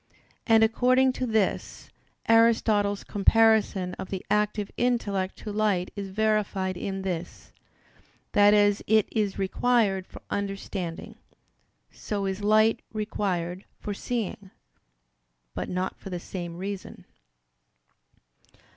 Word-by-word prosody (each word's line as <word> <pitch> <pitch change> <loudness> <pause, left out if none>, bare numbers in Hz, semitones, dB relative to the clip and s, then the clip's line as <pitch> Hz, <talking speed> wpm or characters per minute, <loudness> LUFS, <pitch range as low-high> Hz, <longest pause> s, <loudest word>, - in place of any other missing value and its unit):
And 225 -1 +6
according 255 +3 +3
to 255 -1 -3
this, 220 -3 -1 0.4
Aristotle's 220 -3 +3
comparison 210 -3 +3
of - - -6
the 190 -2 -5
active 210 -1 0
intellect 205 -6 -1
to 210 - -7
light 205 -4 0
is 200 -2 -5
verified 205 -2 0
in 195 +1 -4
this, 175 -2 -5 0.8
that 205 0 +6
as 205 0 +3
it 220 -1 +4
is 210 -3 -1
required 195 -1 +1
for - - -13
understanding, 195 -4 -4 0.7
so 200 -2 -4
is 195 +1 -3
light 215 +2 +4
required 190 -4 -2 0.2
for 205 - -4
seeing; 205 -3 -4 1.0
but - - -4
not 185 +1 -2
for - - -9
the 180 -2 -4
same 175 -1 -6
reason. 195 +1 -6
205 Hz, 110 wpm, -26 LUFS, 190-220 Hz, 1.0 s, And